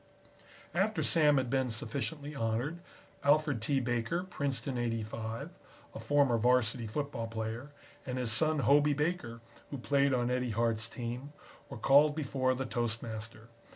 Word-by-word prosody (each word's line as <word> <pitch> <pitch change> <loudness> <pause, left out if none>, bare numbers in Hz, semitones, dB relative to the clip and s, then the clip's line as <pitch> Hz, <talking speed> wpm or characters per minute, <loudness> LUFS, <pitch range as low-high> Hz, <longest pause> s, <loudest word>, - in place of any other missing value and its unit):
After 200 +5 +1
Sam 150 -3 +4
had 130 -2 0
been 130 -2 +1
sufficiently 140 +7 -4
honored, 120 +6 -2 0.4
Alfred 145 -4 +3
T. 135 +4 +1
Baker, 120 +8 -1
Princeton 140 -6 -3
'85, 115 -1 -3 0.4
a - - -7
former 140 -5 +3
Varsity 120 -1 +2
football 130 -1 -3
player, 115 +4 -4 0.3
and 130 -1 -4
his 125 -3 -1
son 155 +5 +2
Hobey 145 +1 +4
Baker, 150 -7 -2 0.3
who 140 - -5
played 140 +2 +2
on 125 -1 +1
Eddie 125 0 0
Hart's 115 0 0
team, 125 +5 -6 0.4
were - - -7
called 145 +2 +5
before 130 -4 0
the 135 +1 -3
toastmaster. 115 -1 -4
125 Hz, 140 wpm, -32 LUFS, 115-145 Hz, 0.4 s, called